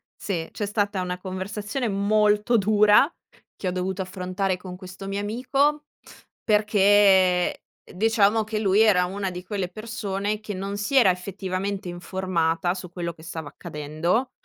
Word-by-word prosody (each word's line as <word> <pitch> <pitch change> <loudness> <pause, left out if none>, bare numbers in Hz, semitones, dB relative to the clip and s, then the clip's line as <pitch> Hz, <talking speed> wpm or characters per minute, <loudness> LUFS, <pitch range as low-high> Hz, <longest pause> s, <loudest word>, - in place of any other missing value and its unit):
sì. 170 -5 -3
C'è 210 - -3
stata 205 -2 -1
una 180 0 -3
conversazione 205 +6 -4
molto 210 +3 +2
dura 210 - +5 0.4
che 190 - -5
ho - - +1
dovuto 185 +1 -2
affrontare 185 0 -2
con 180 0 -9
questo 185 +1 -9
mio 200 +1 -2
amico 270 +8 0 0.6
perché, 210 -1 +2 1.0
ehm, - - -16
diciamo 220 0 +3
che 215 0 -3
lui 205 0 +3
era 190 -5 +5
una 195 +1 -3
di 180 0 -7
quelle 190 -2 -3
persone 210 -1 -3
che 215 -1 -6
non 195 +2 -4
si 210 +7 -2
era 225 -8 +7
effettivamente 190 +1 -4
informata 175 -1 -1
su 180 -2 -8
quello 170 -1 -4
che 160 - -17
stava 160 -2 -6
accadendo 155 - -2
195 Hz, 150 wpm, -24 LUFS, 180-210 Hz, 1.0 s, era